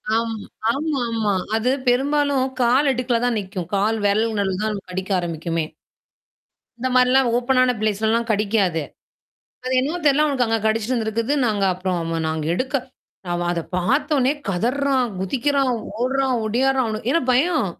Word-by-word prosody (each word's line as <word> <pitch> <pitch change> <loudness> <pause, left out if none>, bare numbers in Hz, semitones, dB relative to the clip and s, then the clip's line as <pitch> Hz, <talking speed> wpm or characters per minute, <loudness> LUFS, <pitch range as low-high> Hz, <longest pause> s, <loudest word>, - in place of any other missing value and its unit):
ஆம், 230 0 0 0.4
ஆமாமா. 240 -8 -1 0.2
அது 225 +3 +1 0.2
பெரும்பாலும் 280 +1 +2 0.2
கால் 260 +4 +3
இடுக்கல 250 -2 0
தான் 245 -3 +1
நிக்கும். 190 -3 -6
கால் 215 +3 +1
விரல் 215 +3 +2
நடுல 190 -2 0
தான் 215 0 0
நமக்கு 200 -3 -7
கடிக்க 190 +2 -4
ஆரம்பிக்குமே. 165 -1 -2 1.2
இந்த 260 - -1
மாரிலாம் 255 0 +4
ஓப்பன்னான 255 0 +2
பிளேஸ்லலாம் 220 +2 +1
கடிக்காது. 200 -6 +1 0.8
அது 255 - -2
என்னமோ 300 +7 -2
தெரில 290 +2 +4
அவனுக்கு 270 -5 +1
அங்க 225 0 +1
கடிச்சுட்டுருந்திருக்குது. 225 +3 0
நாங்க 205 -3 0
அப்புறம் 180 0 -2 0.2
அ - - -2
நாங்க 160 -1 -2
எடுக்க 260 +7 -3 0.5
நாம 175 0 -2
அத 170 - -2 0.2
பார்த்தோனே 270 - +2 0.2
கதர்றான், 255 +6 +1
குதிக்கிறான், 270 +6 +1 0.3
ஓடுறான் 265 +1 +1
ஒடியாடுறான் 260 +3 +1
அவனு 215 +1 -5
ஏன்னா 335 - +2
பயம். 310 - +2
235 Hz, 140 wpm, -21 LUFS, 205-265 Hz, 1.2 s, மாரிலாம்